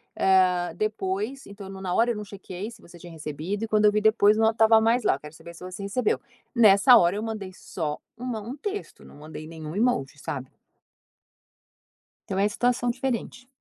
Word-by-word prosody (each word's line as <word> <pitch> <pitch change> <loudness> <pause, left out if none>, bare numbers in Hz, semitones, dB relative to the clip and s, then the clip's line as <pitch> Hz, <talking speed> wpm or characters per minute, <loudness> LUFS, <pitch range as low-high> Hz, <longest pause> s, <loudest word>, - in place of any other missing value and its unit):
eh, 185 -2 +3
depois 215 +4 -3
então 200 -1 -10
no 190 0 -9
na 180 -2 -2
hora 235 +1 +3
eu - - -3
não 210 - -5
chequei 200 0 -8
se 235 -2 -14
você 175 0 -15
tinha 175 -1 -11
recebido 160 +6 -5
e 225 - -2
quando 215 -1 +2
eu 210 - +6
vi 210 - +1
depois 215 -1 +4
não 220 0 +3
tava 220 0 +5
mais 230 +2 +2
lá, - - +3
eu - - -10
quero 150 +2 -11
saber 170 +1 -12
se - - -12
você 185 +2 -7
recebeu". 210 +4 0 0.3
Nessa 220 +2 +7
hora 175 -2 +4
eu 215 - -3
mandei 215 -4 -5
só 180 -8 -5 0.2
um 245 -2 -3
um 230 +6 -6
texto, 410 +6 -6
não - - -15
mandei 155 +1 -9
nenhum 160 0 -8
emoji, 195 - 0
sabe? 135 -2 -6 1.8
Então 190 - -2
é 200 - +3
situação 245 +2 +1
diferente. 250 0 -4
205 Hz, 200 wpm, -26 LUFS, 180-225 Hz, 1.8 s, Nessa